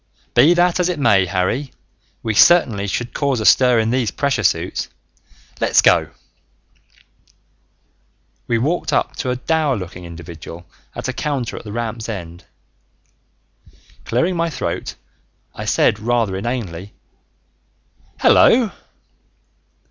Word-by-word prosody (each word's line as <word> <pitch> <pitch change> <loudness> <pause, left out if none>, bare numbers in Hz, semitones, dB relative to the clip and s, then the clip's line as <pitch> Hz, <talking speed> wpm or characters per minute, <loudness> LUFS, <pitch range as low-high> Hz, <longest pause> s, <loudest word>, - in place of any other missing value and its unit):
"Be 170 +5 +5
that 175 +1 +2
as 180 0 +1
it 180 - -2
may, 100 -9 +3
Harry, 95 +10 -1 0.5
we 110 - -1
certainly 110 - +4
should 120 +5 -3
cause 140 -4 0
a 110 - -3
stir 125 0 +5
in 110 0 +1
these 125 -3 0
pressure 140 +2 -1
suits. 90 -2 -1 0.7
Let's - - +3
go!" - - +4 2.4
We 115 - +1
walked 150 +10 -1
up - - 0
to 130 - -3
a 125 - 0
dour 150 +1 0
looking 90 -1 -8
individual 85 0 -10 0.3
at - - -5
a - - -2
counter 140 -5 -3
at - - -8
the 105 - -7
ramp's 115 0 -4
end. 85 -5 -7 1.6
Clearing 165 +11 0
my 170 0 0
throat, - - -4 0.6
I - - -7
said 105 - +2
rather 115 -3 0
inanely, 100 -4 -5 1.3
"Hello!" 230 -4 +5
115 Hz, 125 wpm, -19 LUFS, 95-140 Hz, 2.4 s, Be